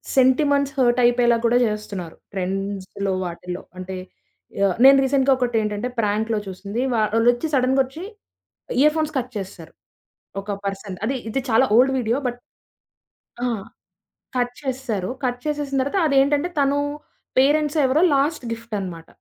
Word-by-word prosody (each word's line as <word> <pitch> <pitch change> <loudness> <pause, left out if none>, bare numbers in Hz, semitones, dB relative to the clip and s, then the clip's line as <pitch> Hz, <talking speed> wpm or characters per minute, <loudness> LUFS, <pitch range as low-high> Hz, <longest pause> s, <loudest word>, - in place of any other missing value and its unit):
Sentiments 275 +2 +3
hurt 245 -1 +3
అయిపోయేలాగ 240 -1 +3
కూడా 235 +1 +4
చేస్తున్నారు. 205 -5 -5 0.2
ట్రెండ్స్‌లో 195 +1 -3
వాటిల్లో 180 +1 -6 0.2
అంటే 185 +1 -6 0.7
యాహ్! 195 -3 +3
నేను 275 0 +9
రీసెంట్‌గా 270 0 +3
ఒకటేంటంటే 225 -2 -1
ప్రాంక్‌లో 215 +1 0
చూసింది. 200 +4 -4
వాళ్ళొచ్చి 230 +5 +2
సడన్‌గొచ్చి, 265 +4 +1 0.8
ఇయర్ 300 +1 +5
ఫోన్స్ 310 -1 -1
కట్ 250 -1 -3
చేసేసారు. 185 -5 -8 0.7
ఒక 200 +1 -8
పర్సన్. 195 -1 -4
అది 265 +5 0
ఇది 270 - -1
చాలా 225 +4 +5
ఓల్డ్ 260 +3 +5
వీడియో 235 0 0
బట్ 245 0 -6 1.0
ఆ! - - +1 0.9
కట్ 245 0 0
చేసేసారు. 250 -8 -3 0.2
కట్ 245 0 -1
చేసేసిన 290 -2 -2
తర్వాత 280 +9 0
అదేంటంటే 285 +4 +2
తను 280 0 +2 0.6
పేరెంట్స్ 295 +3 +3
ఎవరో 265 +5 +3
లాస్ట్ 285 +2 0
గిఫ్ట్ 230 -1 -7
అనమాట. 170 -4 -7
245 Hz, 130 wpm, -22 LUFS, 205-270 Hz, 1.0 s, నేను